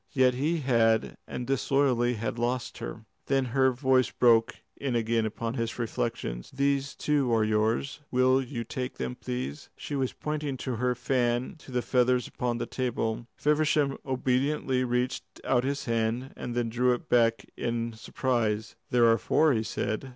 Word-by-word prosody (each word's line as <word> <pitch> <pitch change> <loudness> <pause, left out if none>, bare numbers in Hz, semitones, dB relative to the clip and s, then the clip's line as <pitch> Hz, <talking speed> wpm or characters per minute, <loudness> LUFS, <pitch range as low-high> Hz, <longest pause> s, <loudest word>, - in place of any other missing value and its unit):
Yet 130 -2 +4
he 155 +6 0
had, 115 -4 +2
and 125 - -4
disloyally 130 -2 +2
had 115 +1 -3
lost 120 +1 -2
her. 110 - -7 0.2
Then 135 -1 +2
her 130 -1 +5
voice 130 0 +2
broke 115 -1 +4 0.2
in 135 -3 -2
again 115 -1 +1
upon 115 +1 -4
his 115 -2 -3
reflections. 115 - -3
"These, 140 0 0
too, 145 -5 +1
are 110 -1 +3
yours. 110 +6 0
Will 130 +1 +3
you 125 -2 -4
take 125 +2 -5
them, 65 -1 -3
please?" 65 +4 -5
She 145 - -5
was 135 -2 0
pointing 150 -2 -3
with 125 -4 -3
her 125 0 +1
fan 125 -1 0
to 140 - -13
the 125 -1 0
feathers 125 -1 +2
upon 120 -1 -2
the - - -2
table. 120 -2 -2
Feversham 150 -2 +2
obediently 130 0 0
reached 125 +1 0 0.2
out 125 -2 +2
his 140 +1 -2
hand, 115 +3 -1
and 120 - -5
then 120 -1 0
drew 125 +2 +2
it - - -11
back 115 -1 +3
in 115 -1 -2
surprise. 110 0 -1
"There 120 -1 +4
are 115 0 +5
four," 155 -2 +3
he 110 - +1
said. 110 +3 -3
125 Hz, 165 wpm, -28 LUFS, 115-130 Hz, 0.2 s, her